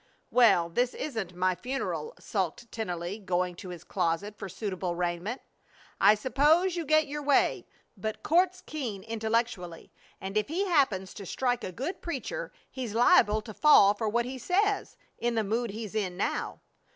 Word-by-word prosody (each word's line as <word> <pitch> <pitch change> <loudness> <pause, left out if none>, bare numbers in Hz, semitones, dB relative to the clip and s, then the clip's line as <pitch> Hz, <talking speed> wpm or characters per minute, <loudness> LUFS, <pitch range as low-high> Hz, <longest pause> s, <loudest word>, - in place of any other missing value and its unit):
"Well, 225 -9 +5
this 245 +9 0
isn't 220 - -4
my 185 +1 +2
funeral," 270 - -4
sulked 235 - -3
Tennelly, 180 -2 -4
going 180 -1 0
to 185 - -8
his 175 -2 -8
closet 185 +3 -1
for 195 -2 -7
suitable 185 -3 -3
raiment. 175 +7 -2 0.6
"I 210 - +7
s'pose 295 - +3
you 340 -2 -3
get 310 +1 +4
your 295 +1 -5
way, 285 -1 +2 0.3
but 215 +2 -5
Court's 365 +3 +2
keen 235 -11 -5
intellectually, 220 -6 -2 0.3
and 195 +2 -4
if 215 - +1
he 360 +6 -1
happens 240 - +2
to 200 - -8
strike 245 +2 -1
a 185 - -4
good 270 - -5
preacher 350 - -4 0.2
he's 245 -5 -5
liable 215 -2 +5
to 215 0 -9
fall 205 -7 +6
for 215 +1 -2
what 235 +2 +1
he 260 +1 -6
says, 400 - 0 0.2
in 235 0 0
the 220 - +1
mood 225 +3 -1
he's 215 0 -6
in 190 -5 -2
now." - - -2
220 Hz, 165 wpm, -29 LUFS, 190-275 Hz, 0.6 s, I